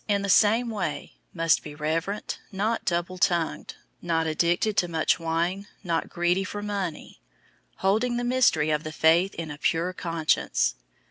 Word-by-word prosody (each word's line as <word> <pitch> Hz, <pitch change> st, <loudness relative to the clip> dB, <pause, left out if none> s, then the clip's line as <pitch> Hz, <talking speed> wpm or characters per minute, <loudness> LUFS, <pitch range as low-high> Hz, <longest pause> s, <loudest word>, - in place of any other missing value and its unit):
}, -, -, -39 dB
in 200 Hz, -1 st, +1 dB
the 200 Hz, -, -2 dB
same 225 Hz, +5 st, +4 dB
way, 170 Hz, -9 st, -4 dB, 0.2 s
must 165 Hz, -2 st, +2 dB
be 150 Hz, -1 st, -9 dB
reverent, 165 Hz, +7 st, -2 dB
not 215 Hz, +4 st, -1 dB
double 175 Hz, +1 st, -1 dB
tongued, 170 Hz, -2 st, 0 dB, 0.3 s
not 165 Hz, -1 st, 0 dB
addicted 170 Hz, +6 st, +1 dB
to 175 Hz, -, +2 dB
much 165 Hz, +1 st, +1 dB
wine, 170 Hz, +4 st, -1 dB, 0.2 s
not 165 Hz, -3 st, -1 dB
greedy 175 Hz, +2 st, +1 dB
for 205 Hz, +2 st, -5 dB
money; 195 Hz, -6 st, -4 dB, 0.5 s
003:009 -, -, -31 dB
holding 220 Hz, +6 st, +1 dB
the 245 Hz, -, -2 dB
mystery 240 Hz, -12 st, +3 dB
of 150 Hz, 0 st, 0 dB
the 155 Hz, -, -5 dB
faith 165 Hz, +5 st, +3 dB
in 160 Hz, -2 st, -5 dB
a 145 Hz, -, -9 dB
pure 170 Hz, +4 st, 0 dB
conscience. 160 Hz, -, 0 dB
175 Hz, 170 wpm, -26 LUFS, 160-200 Hz, 0.5 s, same